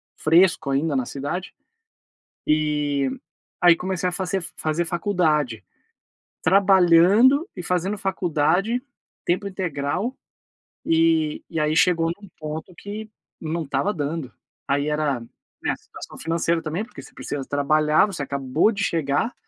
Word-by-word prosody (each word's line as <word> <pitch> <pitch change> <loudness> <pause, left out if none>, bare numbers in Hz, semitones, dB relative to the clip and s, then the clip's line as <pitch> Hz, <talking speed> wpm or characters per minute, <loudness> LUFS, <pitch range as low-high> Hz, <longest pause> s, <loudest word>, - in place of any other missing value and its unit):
fresco 165 -2 +3
ainda 145 +2 +1
na 130 -2 0
cidade. 145 +9 -5 1.0
Eh, 150 -2 +1 0.5
aí 175 -1 +7
comecei 185 0 -2
a - - -3
fazer 190 +1 -2
fazer 155 +2 -1
faculdade, 160 - 0 0.8
trabalhando 195 - +5
e 180 - -5
fazendo 180 +3 -1
faculdade, 185 +4 0 0.4
tempo 185 +3 0
integral, 185 - -2 0.7
eh, 325 -2 +2
e 160 - -3
aí 150 +1 +1
chegou 165 0 +3
num 200 - -12
ponto, 155 +3 -6
que 210 +4 -7 0.3
não 165 +1 -2
estava 140 +8 0
dando. 150 -4 -4 0.3
Aí 140 +1 0
era, 150 -4 0
né, 115 - -8
a - - -5
situação - - -12
financeira 165 0 0
também, 165 +7 -3
porque 225 - -12
você 135 - -15
precisa 140 -2 -5
trabalhar, 150 +4 +3
você 190 -8 -5
acabou 140 - +1
de 200 -2 -3
chegar 160 - 0
165 Hz, 130 wpm, -23 LUFS, 150-190 Hz, 1.0 s, aí